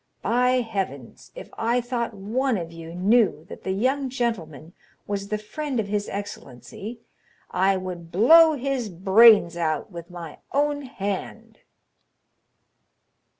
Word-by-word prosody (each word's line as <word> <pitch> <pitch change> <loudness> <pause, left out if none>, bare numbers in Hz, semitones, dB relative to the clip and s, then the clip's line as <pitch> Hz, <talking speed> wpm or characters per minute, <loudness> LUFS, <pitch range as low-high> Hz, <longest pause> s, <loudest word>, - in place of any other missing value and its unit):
By 250 +1 +2
heavens! 190 - -5
if - - -10
I 235 +2 +1
thought 235 -2 -3
one 230 +5 -1
of 165 -2 -6
you 165 0 -9
knew 200 -3 +2
that - - -9
the - - -4
young 260 +7 0
gentleman 175 - -4 0.3
was 200 -1 -3
the 210 +1 -2
friend 265 +5 -4
of 205 -2 -2
his 205 0 -2
excellency, 200 - -8 0.5
I 190 +1 +2
would 180 -3 -7
blow 320 - +7
his 265 -4 -2
brains 190 0 +6
out 165 +4 -2
with 170 -1 -9
my 170 -3 -9
own 290 +1 +1
hand!" 205 -8 -6
205 Hz, 130 wpm, -24 LUFS, 175-245 Hz, 0.5 s, blow